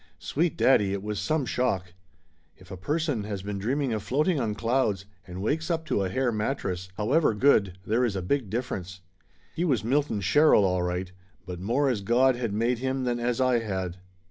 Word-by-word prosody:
Sweet 165 - -1
daddy, 105 -10 +4
it 100 -1 -4
was 105 -1 -3
some 140 +8 0
shock! 95 -9 -1 0.6
If 95 +1 -16
a - - -5
person 145 - -1
has 100 -3 -5
been 100 0 -4
dreaming 130 +4 -1
of 110 - -2
float 145 - 0
ing 175 -6 +2
on 110 -4 -1
clouds 110 -4 0 0.2
and 90 +1 -6
wakes 160 - -1
up 165 -1 -1
to 105 - 0
a 95 - -1
hair 125 +5 0
mattress, 105 -5 -3
however 125 +3 +2
good, 105 -7 +3
there 115 +4 +1
is 115 -5 0
a 95 - -3
big 125 +2 -1
difference. 95 -5 -4 0.5
He 170 - -2
was 135 -11 +1
Milton 135 -2 0
Sher 145 - +4
rill, 100 - +5
all 90 -1 +1
right, 90 +1 -2 0.3
but 90 -1 -6
more 120 +10 +1
as 120 -6 0
God 125 +5 +3
had 120 -3 -3
made 115 +3 0
him 130 +1 -1
than 120 -1 -1
as 120 +1 -1
I 130 -2 +3
had. 95 -5 -4
115 Hz, 205 wpm, -27 LUFS, 95-135 Hz, 0.6 s, rill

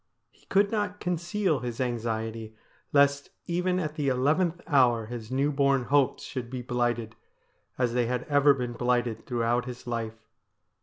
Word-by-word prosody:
He - - -28
could 200 +1 +3
not 205 -2 -1
conceal 180 -1 0
his 120 -2 -5
anxiety 115 -2 -3 0.4
lest 140 0 +3 0.2
even 180 +1 0
at 155 -4 -2
the 150 -3 -2
eleventh 155 +7 +2
hour 125 -6 +3
his 115 -1 -7
new 135 +3 +1
born 140 -2 +2
hopes 140 +1 +2
should 125 -3 -5
be 125 -1 -5
blighted, 120 -2 -1 0.6
as 125 -2 +1
they 120 -1 +1
had 125 0 -1
ever 145 -1 +4
been 125 -2 -3
blighted 120 -2 -1
throughout 120 0 0
his 125 -1 -8
life. 115 -2 -4
125 Hz, 155 wpm, -28 LUFS, 120-145 Hz, 0.6 s, ever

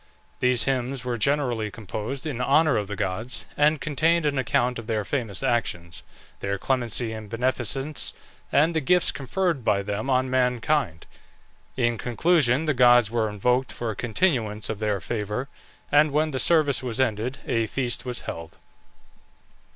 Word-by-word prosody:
These 125 -2 +4
hymns 130 -1 -1
were 125 -1 -1
generally 120 -3 0
composed 110 - -5
in 135 -6 -3
honour 140 +2 +3
of 105 -2 -1
the 105 - -5
gods, 105 +5 -3
and 150 +1 +3
contained 160 +3 +1
an 145 -2 +1
account 125 -1 0
of 115 - -9
their 110 -3 -1
famous 115 -4 -3
actions, 95 -9 -1 0.4
their 100 0 -2
clemency 120 0 0
and 110 -2 -8
beneficence, 130 +4 -1 0.4
and 160 +4 +3
the 160 - +1
gifts 180 +5 +3
conferred 160 +1 -2
by 100 -2 +1
them 105 +5 -3
on 130 0 +2
mankind. 125 - 0 0.7
In 120 -3 +1
conclusion, 145 +1 +2
the 155 - +1
gods 120 -3 +5
were 115 -2 0
invoked 125 +5 0
for 115 -2 -4
a - - -7
continuance 115 - 0
of 110 -2 -3
their 105 -2 0
favour, 105 +5 -3 0.4
and 150 +1 +5
when 155 +2 +1
the 130 - -2
service 155 -4 +3
was 125 -3 -3
ended 125 +1 0
a 115 -1 0
feast 120 0 -2
was 125 -1 -1
held. 85 -1 -7
125 Hz, 160 wpm, -25 LUFS, 110-140 Hz, 0.7 s, gods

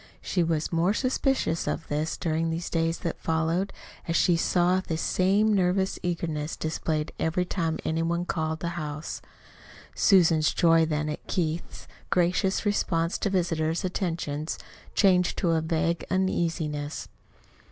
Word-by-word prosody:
She 180 - -1
was 160 -2 0
the - - -3
more 175 +5 +2
suspicious 255 - 0
of 165 - -2
this 155 +2 -2
during 165 0 0
the 165 - -1
days 165 -1 -1
that 170 - -3
followed, 165 +4 0 0.4
as 165 - 0
she 175 - +4
saw 180 +2 +2
this 160 -3 -3
same 200 +6 +2
nervous 190 0 +1
eagerness 165 -3 -2
displayed 155 -1 -2
every 170 +3 0
time 165 -3 -1
any 160 +1 0
one 170 +1 0
called 160 -2 -1
at 160 - -7
the 170 - -2
house. 155 -2 -5 0.7
Susan's 165 -5 +4
joy 165 -1 +4
then 150 -1 -1
at 150 - -5
Keith's 165 -2 -3 0.2
gracious 180 +3 +1
response 170 -4 0
to 200 - 0
visitors' 165 -2 0
attentions 165 -5 -2 0.4
changed 180 -3 +3
to 175 -4 +1
a 160 -1 +2
vague 165 +1 0
uneasiness. 165 -5 -1
165 Hz, 145 wpm, -27 LUFS, 160-180 Hz, 0.7 s, she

